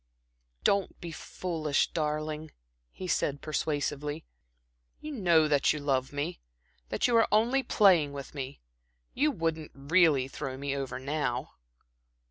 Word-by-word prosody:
"Don't 200 -1 +1
be 170 - -6
foolish, 160 -3 -1
darling," 155 0 -2 0.4
he 185 - -7
said, 145 -4 0
persuasively. 150 0 -2 0.7
"You 305 - -7
know 170 - +4
that 145 -1 +3
you 150 - -4
love 135 -2 0
me, 145 +5 -3 0.5
that - - +1
you 240 - +2
are 225 - +5
only 235 +6 +3
playing 185 - +4
with 140 -1 -8
me. 135 - -6 0.5
You 295 +4 +2
wouldn't 165 - -2
really 145 -1 +3
throw 135 -1 -5
me 140 0 -2
over 135 -2 -3
now." 135 -2 -2
155 Hz, 130 wpm, -29 LUFS, 140-175 Hz, 0.7 s, are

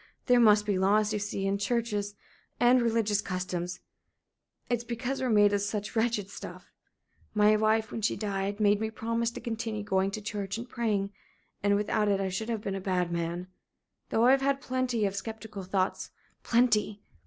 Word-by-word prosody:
There 245 -1 +5
must 210 -2 +5
be 200 -3 0
laws, 210 +3 +3
you 210 - 0
see 200 -1 -3
and 200 +1 0
churches 210 -2 -1 0.4
and 245 +1 +5
religious 220 -3 +1
customs. 180 -1 -4 0.9
It's 240 -1 -1
because 245 +3 -3
we're 255 - 0
made 205 -2 +5
of 200 - +1
such 205 +2 -3
wretched 225 -3 +1
stuff. - - -9 0.6
My 210 0 +5
wife, 220 0 +2
when 225 - -4
she 215 - +1
died 200 -1 -2
made 205 0 +3
me 220 - -1
promise 230 +1 -1
to 235 - -8
continue 225 -2 -4
going 190 -1 +1
to 200 - -5
church 205 -1 -4
and 235 +2 -6
praying. 210 -5 -1 0.5
And 205 0 +3
without 210 +1 +1
it 200 -1 +2
I 195 -1 -1
should 220 +5 -3
have 225 -3 -2
been 195 - -3
a 195 - -4
bad 180 -2 0
man. 170 +1 -2 0.6
Though 225 - +3
I've 265 +2 +5
had 275 0 +1
plenty 255 -4 -1
of 195 0 -1
sceptical 220 -1 -6
thoughts 190 0 -1 0.3
plenty. 215 -4 +2
210 Hz, 180 wpm, -29 LUFS, 200-230 Hz, 0.9 s, There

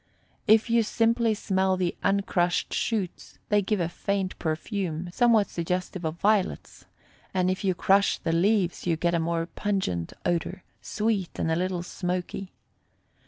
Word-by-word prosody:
If 220 +2 +5
you 230 0 +4
simply 230 +1 +2
smell 190 -2 +1
the 180 -2 -1
uncrushed 180 -3 +1
shoots, 205 -6 -2
they 210 0 +4
give 205 +1 0
a 170 - +1
faint 190 +2 -2
perfume, 170 +1 -3
somewhat 230 -3 +4
suggestive 180 +1 -3
of 160 0 -2
violets; 205 +2 0 0.5
and 185 0 +2
if 185 - -3
you 190 -2 +1
crush 195 +3 +3
the 165 - -2
leaves 180 0 +1
you 170 - +3
get 170 +2 0
a 170 - +2
more 165 0 -1
pungent 185 - -2
odor, 175 +1 -1 0.2
sweet 210 -4 -1
and 160 - 0
a - - +2
little 180 0 -1
smoky. 180 +1 -4
185 Hz, 150 wpm, -27 LUFS, 175-205 Hz, 0.5 s, If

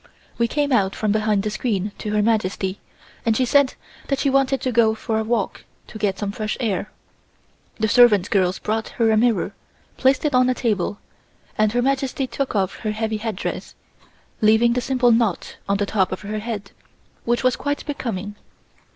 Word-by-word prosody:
We 235 - +3
came 290 +2 -1
out 195 -6 +2
from 215 -1 0
behind 215 -1 +1
the 215 - -2
screen 210 -3 -1
to 210 - -4
Her 210 0 +2
Majesty 200 -3 0 0.4
and 225 -1 +2
she 255 - +2
said 280 +1 +3 0.3
that 275 - 0
she 275 - +1
wanted 270 0 +2
to 255 - -1
go 225 -2 +3
for 220 0 -2
a - - -1
walk 220 -3 -2 0.2
to 215 - -10
get 200 -3 0
some 200 0 -3
fresh 215 +1 -3
air. 210 -4 -1 0.9
The 220 - 0
servant 210 -5 +5
girls 185 -2 +2
brought 220 +1 -2
her 225 -2 +3
a - - +4
mirror, 230 0 +2 0.4
placed 265 +2 +2
it 295 - +1
on 250 0 +4
a 255 - +1
table, 205 -4 -1 0.6
and 215 -1 +2
Her 245 0 +1
Majesty 270 0 0
took 265 -1 -3
off 190 -2 0
her 215 -2 -3
heavy 220 0 -2
headdress, 215 -3 -4 0.7
leaving 220 +2 +4
the 250 - 0
simple 250 -1 +2
knot 225 -5 0
on 200 - +2
the 205 - 0
top 195 -2 0
of 185 - -4
her 210 +1 -4
head, 210 -2 -5 0.5
which 240 +2 0
was 255 0 +3
quite 285 0 -3
becoming. 215 -9 -4
220 Hz, 190 wpm, -22 LUFS, 205-250 Hz, 0.9 s, servant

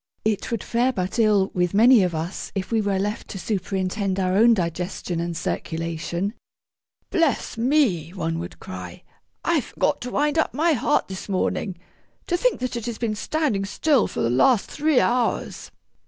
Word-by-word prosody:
It 215 -2 0
would 230 -4 -2
fare 245 +2 +1
but 190 0 -3
ill 210 -3 +3
with 180 +1 0
many 235 +2 +7
of 180 -3 0
us 165 +4 -4
if 190 +2 -3
we 225 -1 +2
were 200 -2 0
left 205 +2 -2
to - - -7
superintend 190 0 -2
our 185 -1 +1
own 230 +3 +6
digestion 175 -1 -3
and 170 -1 -3
circulation. 170 +4 -3 0.8
'Bless 325 -7 +1
me!' 230 - +2
one 165 -3 -3
would 175 +2 -7
cry, 90 -1 -8 0.4
'I - - +3
forgot - - -1
to 250 - -4
wind 295 +4 +1
up 315 - 0
my 320 +3 +3
heart 290 +3 +1
this 190 +1 -7
morning! 190 0 -1 0.5
To 350 - 0
think 470 - +1
that 255 -1 -2
it 235 -1 -4
has 235 -2 -3
been 230 -3 -1
standing 250 -2 -1
still 260 +6 +2
for - - -4
the 115 - +1
last 200 - +3
three 300 -3 +2
hours!' 245 -1 0
205 Hz, 175 wpm, -23 LUFS, 180-245 Hz, 0.8 s, many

